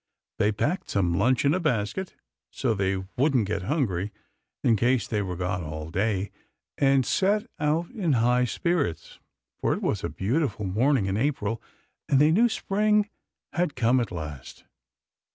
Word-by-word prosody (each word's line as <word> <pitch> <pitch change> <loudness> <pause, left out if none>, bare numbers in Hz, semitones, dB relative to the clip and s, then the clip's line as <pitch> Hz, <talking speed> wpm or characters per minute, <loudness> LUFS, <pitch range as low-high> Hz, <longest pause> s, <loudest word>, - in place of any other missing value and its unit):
They 105 - +3
packed 150 - -1
some 90 -4 +1
lunch 125 +8 +2
in 140 - +4
a 185 - +1
basket, 155 - -1 0.3
so 125 -4 -1
they 95 -2 -1
wouldn't 130 -4 +3
get 100 -1 -2
hungry, 105 - -1 0.5
in 115 - +4
case 120 +1 +2
they 105 -2 -1
were 90 -3 -3
gone 90 0 -2
all 80 +1 -6
day, 100 +1 0 0.4
and 135 -2 +3
set 205 - +2
out 155 +3 0
in 190 - 0
high 125 +1 +3
spirits; 165 - -2 0.4
for - - +1
it - - -6
was - - -1
a - - -1
beautiful 125 +1 -1
morning 110 +4 +2
in 95 +1 -1
April, 115 -4 -1 0.5
and 135 - +4
they 150 +2 +5
knew 230 +8 +4
Spring 210 0 +1 0.4
had 175 -4 0
come 125 +1 +3
at 115 -4 -2
last. 75 -6 -7
125 Hz, 160 wpm, -26 LUFS, 100-150 Hz, 0.5 s, they